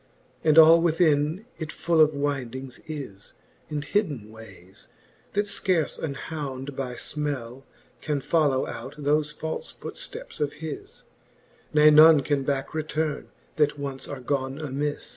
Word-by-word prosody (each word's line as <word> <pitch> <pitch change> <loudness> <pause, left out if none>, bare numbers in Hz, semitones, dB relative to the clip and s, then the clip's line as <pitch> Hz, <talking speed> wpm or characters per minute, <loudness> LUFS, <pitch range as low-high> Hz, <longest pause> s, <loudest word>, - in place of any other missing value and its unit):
■ - - -36 0.4
And 155 -1 +4
all 165 +1 +9
within 160 +2 +2
it 155 -2 -4
full 165 0 +2
of 155 -1 +4
wyndings 135 -3 -3
is, 135 -11 -8 0.4
And 150 -1 -3
hidden 145 - -1
wayes, 95 -4 -12 0.5
that 205 +1 +1
fcarle 185 -5 0
an 145 -4 -3
hound 140 -2 -6
by 125 -2 -4
frnell 135 -5 -4 0.4
Can 150 -2 -1
follow 140 -2 +2
out 130 +5 -7
thofe 150 +1 +1
falle 160 +1 -4
footfteps - - -7
of 145 -1 -1
his, 155 -2 -8 0.7
Ne 150 0 +6
none 155 0 +8
can 140 +1 0
backe 135 0 -2
returne, 155 -1 -2 0.3
that 150 -1 +2
once 140 -2 -5
are 140 -2 -6
gone 130 +1 -2
amis. 145 0 -3
145 Hz, 140 wpm, -26 LUFS, 135-155 Hz, 0.7 s, all